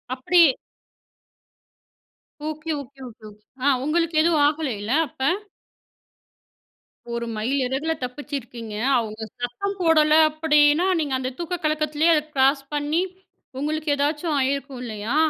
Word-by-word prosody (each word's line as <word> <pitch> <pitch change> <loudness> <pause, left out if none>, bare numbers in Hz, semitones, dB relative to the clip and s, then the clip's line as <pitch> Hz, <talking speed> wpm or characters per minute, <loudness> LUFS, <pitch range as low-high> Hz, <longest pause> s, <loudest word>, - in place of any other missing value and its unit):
அப்டி, 345 +7 +3 2.1
okay, 310 +1 -4
okay 275 +1 -15
,okay, 235 -1 -14
okay. 210 0 -18 0.2
ஆ - - +4 0.2
உங்களுக்கு 330 +2 0
எதுவும் 320 -2 +3
ஆகலைல்ல 260 -9 -2 0.2
அப்ப? 265 - -16 1.9
ஒரு 235 0 -2
மைல் 225 +6 -1
இறகுல 280 +6 -1
தப்பிச்சிருக்கீங்க. 250 -4 -6 0.2
அவங்க 220 -2 -3 0.2
சத்தம் 315 +12 -3
போடல 310 -2 +4 0.2
அப்டின்னா, 305 +2 +3
நீங்க 280 -3 -1
அந்த 255 0 -3
தூக்க 345 +1 -3
கலக்கத்திலேயே 305 +1 +2
அத 300 - +1
கிராஸ் 275 +1 +3
பண்ணி, 295 +4 0 0.6
உங்களுக்கு 310 +2 -2
ஏதாச்சும் 295 +2 0
ஆயிருக்கும் 275 -1 -2
இல்லையா? 215 +3 -4
290 Hz, 115 wpm, -23 LUFS, 255-310 Hz, 2.1 s, ஆ